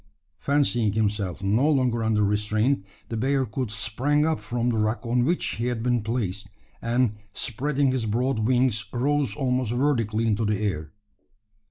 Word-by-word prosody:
Fancying 120 -7 +1
himself 100 -3 -1
no 110 +10 +3
longer 125 -5 +2
under 110 -1 +2
restraint, 105 +4 +1 0.3
the 115 - -3
bearcoot 130 0 0
sprang 120 +8 0
up 160 -1 0
from 120 0 -1
the 115 - 0
rock 110 +3 -1
on 120 +1 +2
which 175 -6 0
he 115 +2 -1
had 120 -2 -2
been 120 -1 +1
placed; 105 -3 -3 0.3
and, 120 -1 +1 0.2
spreading 135 +5 0
his 125 -4 -1
broad 120 +3 0
wings, 120 -1 +2
rose 140 +3 0
almost 125 -4 0
vertically 120 -4 +1
into 110 0 +1
the 105 -1 +1
air. 80 -8 -2
120 Hz, 155 wpm, -25 LUFS, 105-130 Hz, 0.3 s, no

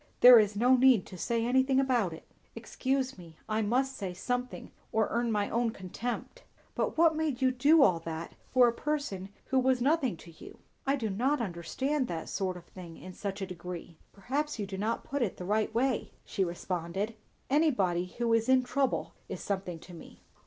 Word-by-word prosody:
"There 245 -1 +11
is 210 -1 +1
no 245 +5 +5
need 255 -6 +5
to 185 - -10
say 230 +5 -1
anything 260 +2 +3
about 245 -9 +2
it." 160 - -9 0.3
"Excuse 265 -3 -2
me; 165 -3 -13
I 220 0 0
must 260 +5 +1
say 190 -6 -5
something, 250 +5 -3 0.2
or 220 -1 +2
earn 235 0 0
my 205 -2 +1
own 235 0 +1
contempt. 230 - -5 0.3
But - - -2
what 325 -1 +5
made 310 -5 -1
you 260 -1 +3
do 285 +5 +5
all 180 -9 +4
that 165 0 -6 0.2
for 250 -1 +6
a 235 - +1
person 280 -10 -3 0.2
who 265 - +2
was 260 0 +2
nothing 270 - +1
to 170 - -13
you? 160 - -13 0.3
I 275 - +3
do 225 -6 -2
not 260 +9 +1
understand 245 - -2
that 165 -2 -5
sort 185 -2 -2
of 175 - -13
thing, 175 -3 -11
in 185 - -10
such 200 +1 -4
a - - -1
degree." 180 -2 -8
"Perhaps 280 +9 -3
you 210 - -2
do 195 0 -6
not 220 +3 -1
put 280 0 -3
it 220 -6 -1
the 180 - -6
right 215 +3 +1
way," 245 +2 0 0.2
she 195 - -1
returned. 180 +3 -3 0.4
"Anybody 200 - +2
who 235 -1 +1
is 230 +2 +2
in 260 -1 +5
trouble 265 +1 -1 0.2
is - - -5
something 190 -4 -3
to 175 +2 -13
me." 165 - -13
230 Hz, 195 wpm, -30 LUFS, 185-260 Hz, 0.4 s, There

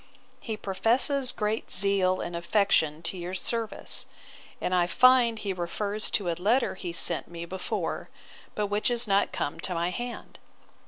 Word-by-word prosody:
He 220 -3 -5
professes 245 +7 +2
great 215 +1 -2
zeal 185 -1 +3
and 175 0 -5
affection 170 -3 +1
to 180 +3 -3
your 175 +2 -4
service: 225 +3 -3 0.5
and 185 - -1
I 175 -1 +3
find 250 +1 +5
he 205 -2 -3
refers 200 +4 -3
to 185 -4 0
a - - 0
letter 215 +9 +1
he 180 -2 -6
sent 170 - +1
me 170 0 -7
before, 185 +2 -4 0.5
but 210 - 0
which 205 +5 0
is 240 -1 +1
not 200 0 +2
come 145 - -3
to 180 - -2
my 170 +1 0
hand. 240 +4 -6
200 Hz, 160 wpm, -28 LUFS, 175-225 Hz, 0.5 s, find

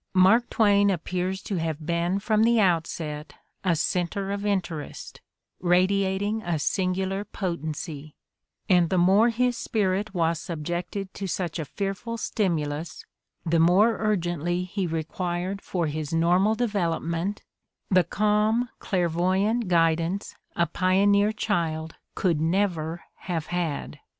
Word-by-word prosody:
Mark 195 +6 +5
Twain 205 -2 +4
appears 185 +1 -2
to 195 - -3
have 160 -2 -3
been 170 +3 0
from 215 +1 +1
the 230 +1 +4
outset 160 -5 -1 0.3
a 180 -3 +2
center 180 +4 -1
of 200 0 -3
in 205 -2 +2
terest, 165 -5 -8 0.4
radiating 190 +4 +1
a 170 -5 -1
singular 190 +4 -1
potency; 155 -5 -5 0.5
and 175 -3 +4
the 185 - +1
more 195 +6 +5
his 245 +1 +1
spirit 205 -2 -1
was 165 -2 +1
subjected 175 +4 -4
to 195 - -5
such 175 -2 -3
a 155 - -3
fearful 195 - -4
stimulus 165 -8 -2 0.4
the 165 0 +2
more 190 +7 +4
urgently 175 -4 0
he 185 0 -3
required 175 +4 -3
for 175 -3 -2
his 150 -1 -3
normal 175 +6 +3
develop 200 -8 0
ment 170 +5 -2 0.5
the 185 -1 +5
calm, 215 +6 +1
clairvoyant 185 +5 +1
guidance 170 +2 +1 0.2
a 170 - +3
pioneer 200 +3 +3
child 165 -7 -2 0.2
could 170 -5 +1
never 170 -2 0
have 165 -4 -3
had. 160 -4 -3
180 Hz, 125 wpm, -26 LUFS, 165-200 Hz, 0.5 s, Mark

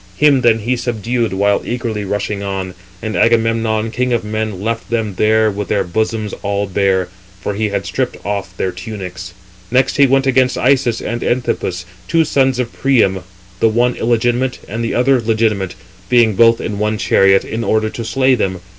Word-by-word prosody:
Him 145 -3 +4
then 115 -2 +4
he 120 +4 0
subdued 120 -1 -2
while 100 +1 +1
eagerly 115 -4 -3
rushing 105 +1 -2
on. 95 -2 -4 0.3
And 110 -1 -3
Agamemnon, 115 -1 +1
king 125 +1 -1
of 120 - 0
men, 110 -2 -3
left 115 +3 -3
them 110 -3 -1
there 110 +3 +2
with 100 0 -4
their - - +1
bosoms 110 +3 -2
all 100 0 -1
bare, 95 -2 0 0.3
for 100 - -3
he 105 +1 -1
had 100 - -3
stripped - - -2
off 100 -2 -4
their 95 - -1
tunics. 95 -2 -8 0.3
Next 130 +2 +2
he 140 -1 +6
went 135 +1 +2
against 130 -1 +2
Isus 125 -3 +2
and 120 +1 -4
Anthipus, 95 -7 -1 0.2
two 165 - +2
sons 135 -3 +2
of 125 -2 -3
Priam, 115 -8 +2 0.4
[the 115 - +4
one] 120 +3 +2
illegitimate, 120 +3 0
and 115 +4 -4
[the 115 - -2
other] 125 +1 +3
legitimate, 110 -4 0 0.3
being 120 -3 +4
both 115 +3 +4
in 105 -2 -4
one 105 0 0
chariot, 95 -1 +3
in 115 +1 -4
order 110 -1 +1
to 115 - -5
slay 130 +3 +2
them. 95 -6 -1
110 Hz, 180 wpm, -16 LUFS, 100-120 Hz, 0.4 s, he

